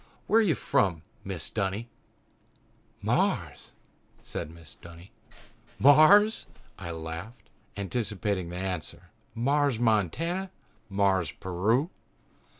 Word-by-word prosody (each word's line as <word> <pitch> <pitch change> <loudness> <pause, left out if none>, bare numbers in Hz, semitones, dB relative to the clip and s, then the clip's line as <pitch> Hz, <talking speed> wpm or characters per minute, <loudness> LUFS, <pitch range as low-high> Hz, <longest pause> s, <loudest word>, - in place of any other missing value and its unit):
"Where 225 - +4
are - - +5
you 180 -9 +2
from, 85 -7 +1 0.2
Mrs. 95 -4 -6
Dunny?" 100 +2 -2 1.2
"Mars!" - - 0 0.5
said - - -5
Mrs. 85 -1 -12
Dunny. 85 +2 -13 0.7
"Mars!" 175 - +6 0.3
I 90 -3 -6
laughed, 80 +7 -7 0.3
anticipating 100 -3 -2
the 90 - -7
answer. 90 -3 -5 0.2
"Mars, 140 +1 +2
Montana? 120 - 0 0.4
Mars, 95 -4 +1
Peru?" 110 - 0
100 Hz, 95 wpm, -28 LUFS, 90-140 Hz, 1.2 s, Mars